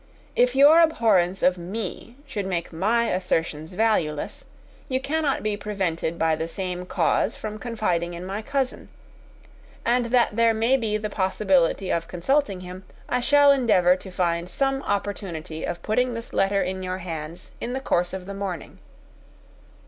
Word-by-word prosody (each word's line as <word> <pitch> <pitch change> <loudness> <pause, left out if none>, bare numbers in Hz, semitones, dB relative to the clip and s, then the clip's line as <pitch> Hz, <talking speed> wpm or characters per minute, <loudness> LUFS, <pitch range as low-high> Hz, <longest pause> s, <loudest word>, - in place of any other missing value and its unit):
If 250 +1 +3
your 290 +4 +8
abhorrence 205 - +3
of 180 0 +3
me 205 +5 -6
should 210 -9 -4
make 175 -3 -3
my 225 +8 +1
assertions 165 -2 -1
valueless, 180 -8 0 0.4
you 260 -1 +1
cannot 290 +1 -1
be 210 -1 0
prevented 190 -5 -2
by 160 -1 +2
the 160 +1 -3
same 180 0 -4
cause 205 - +1
from 215 0 -6
confiding 180 -8 -1
in 175 +1 -7
my 195 +3 -4
cousin; 270 +2 -2 1.0
and 245 +1 +2
that 235 -2 +2
there 230 0 +4
may 230 +4 +3
be 220 -5 0
the 215 0 -4
possibility 190 -2 +1
of 165 0 -1
consulting 195 - 0
him, 185 +1 -9 0.2
I 250 - 0
shall 285 +3 +6
endeavour 210 -10 +4
to 190 - -10
find 175 -1 -1
some 270 +7 0
opportunity 185 - -3
of 170 0 -5
putting 245 +3 +1
this 230 0 -7
letter 195 0 +2
in 185 +1 -3
your 185 0 -3
hands 165 -1 -7
in 245 - -3
the 265 - -1
course 175 -9 0
of 190 -1 -6
the 200 - -6
morning. 195 -5 -5
195 Hz, 160 wpm, -24 LUFS, 180-235 Hz, 1.0 s, your